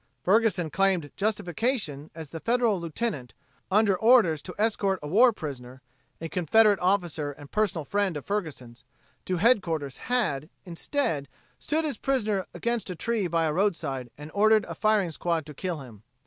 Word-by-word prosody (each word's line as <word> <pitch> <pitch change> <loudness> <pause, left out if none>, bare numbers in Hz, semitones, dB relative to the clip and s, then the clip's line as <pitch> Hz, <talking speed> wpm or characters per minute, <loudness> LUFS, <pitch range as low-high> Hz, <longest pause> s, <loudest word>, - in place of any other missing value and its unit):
Ferguson 190 -5 +2
claimed 190 -6 +1
justification 205 - -2
as 160 -3 -8
the 165 - -6
Federal 235 -1 +1
lieutenant, 165 - -4 0.3
under 200 0 +3
orders 205 - +4
to 180 - -9
escort 205 -3 +1
a - - -4
war 230 +10 +5
prisoner 130 - -8 0.4
a 165 - -4
Confederate 200 +5 +3
officer 175 -6 0
and 145 0 -14
personal 200 -8 0
friend 200 -1 0
of 145 - -8
Ferguson's 150 - -5 0.4
to 185 - -1
headquarters, 170 - +1
had, 175 - 0 0.2
instead, 165 - -2 0.3
stood 315 +1 -1
his 295 - -3
prisoner 215 -8 0
against 235 -3 -2
a 180 - -4
tree 225 +1 -1
by 165 -1 +1
a 155 - 0
roadside 150 -9 -1
and 150 +2 -9
ordered 215 +1 +4
a - - -6
firing 215 -5 +1
squad 165 -1 -1
to 150 - -9
kill 170 0 -4
him. 115 -6 -12
180 Hz, 160 wpm, -27 LUFS, 155-215 Hz, 0.4 s, war